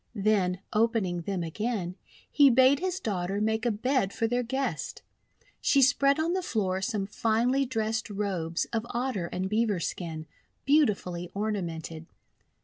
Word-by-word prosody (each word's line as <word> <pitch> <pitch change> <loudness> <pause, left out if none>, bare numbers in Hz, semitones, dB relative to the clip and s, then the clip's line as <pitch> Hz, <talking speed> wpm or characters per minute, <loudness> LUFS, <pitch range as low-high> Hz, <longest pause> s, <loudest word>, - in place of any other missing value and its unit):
Then, 195 -3 +1
opening 210 -6 +1
them 185 0 -3
again, 185 +1 -2 0.4
he 285 -2 +6
bade 260 +3 +5
his 370 +1 -2
daughter 195 -1 -2
make 220 +2 0
a - - +3
bed 245 -1 0
for 225 - -1
their 245 +2 +1
guest. 265 +3 -3 0.6
She 275 -1 +4
spread 275 +2 +4
on 330 +2 +1
the 375 - 0
floor 190 - -1
some 210 -2 -1
finely 235 +6 +1
dressed 220 -2 -2
robes 190 -5 -2
of 225 -1 0
Otter 240 -7 -2
and 185 +2 -3
Beaver 210 -2 +1
skin, 160 -2 -4 0.4
beautifully 200 - +2
ornamented. 170 -6 -3
215 Hz, 140 wpm, -28 LUFS, 185-250 Hz, 0.6 s, he